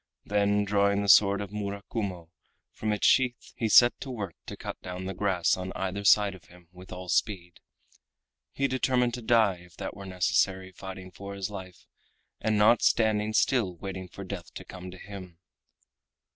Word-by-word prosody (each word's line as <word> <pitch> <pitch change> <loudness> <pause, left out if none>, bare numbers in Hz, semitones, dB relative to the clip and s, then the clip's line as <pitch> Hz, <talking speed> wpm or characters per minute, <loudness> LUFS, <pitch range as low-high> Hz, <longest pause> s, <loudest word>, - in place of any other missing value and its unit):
Then 105 0 +2
drawing 100 0 +2
the - - -3
sword 100 0 +6
of 100 -2 -6
Murakumo 100 -4 -5 0.4
from 110 - -3
its 105 - 0
sheath 125 -2 +2
he 115 - -1
set 120 +3 +7
to 135 - -7
work 105 -8 -5
to - - -7
cut - - -7
down 90 0 -6
the 95 - -3
grass 90 -3 +1
on 95 0 -5
either 95 +1 -3
side 100 0 +5
of 95 -3 -14
him 90 -1 -19
with 90 +1 -14
all 90 0 -7
speed. 90 -1 -1 0.9
He 140 - 0
determined 125 -2 +1
to 125 - -4
die, 110 -5 +3
if 85 -2 -18
that - - -5
were 100 -1 -9
necessary, 95 +1 0
fighting 95 0 -9
for 100 +2 -8
his 100 +1 -4
life 95 -3 -9 0.5
and 110 -1 0
not 110 +3 +5
standing 110 -1 +2
still 110 -6 +2
waiting 95 +1 -6
for 100 - -9
death 95 -2 -7
to - - -8
come 95 0 -9
to 90 - -10
him. 95 -3 -10
100 Hz, 180 wpm, -28 LUFS, 95-105 Hz, 0.9 s, set